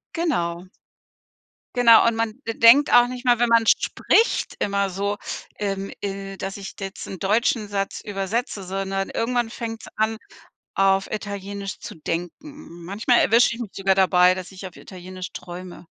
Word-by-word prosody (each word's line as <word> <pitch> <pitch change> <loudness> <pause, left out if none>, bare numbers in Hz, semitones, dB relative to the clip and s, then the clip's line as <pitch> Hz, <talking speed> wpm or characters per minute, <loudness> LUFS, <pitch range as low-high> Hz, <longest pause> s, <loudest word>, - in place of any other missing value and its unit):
Genau. 175 - -1 1.1
Genau. 235 -2 +7
Und 230 - +2
man 225 +1 -2
de 225 - -1
denkt 245 +6 +6
auch 245 0 +7
nicht 250 +1 -7
mal, 245 -1 +4
wenn 240 0 +2
man 230 -1 +4
spricht 455 - +2
immer 200 -1 0
so, 200 +2 -2 0.4
ähm, 195 -1 -3
äh, 195 -1 -5
dass 195 0 -5
ich 195 -1 -8
jetzt 195 -1 -6
'n 190 - -8
deutschen 215 +3 +1
Satz 200 -1 -3
übersetze, 205 +2 -3
sondern 195 +1 -3
irgendwann 240 0 -1
fängts 225 -1 -6
an, 220 +1 +1 0.6
auf 195 0 +2
Italienisch 200 -2 -5
zu - - -9
denken. 175 - -7
Manchmal 215 +6 +1
erwische 230 +1 +4
ich - - -10
mich 225 -5 -5
sogar 195 -1 +1
dabei, 185 -1 +4
dass 185 0 -8
ich 190 0 -8
auf 175 - -20
Italienisch 185 0 -9
träume. 180 0 -9
200 Hz, 160 wpm, -23 LUFS, 190-230 Hz, 1.1 s, Genau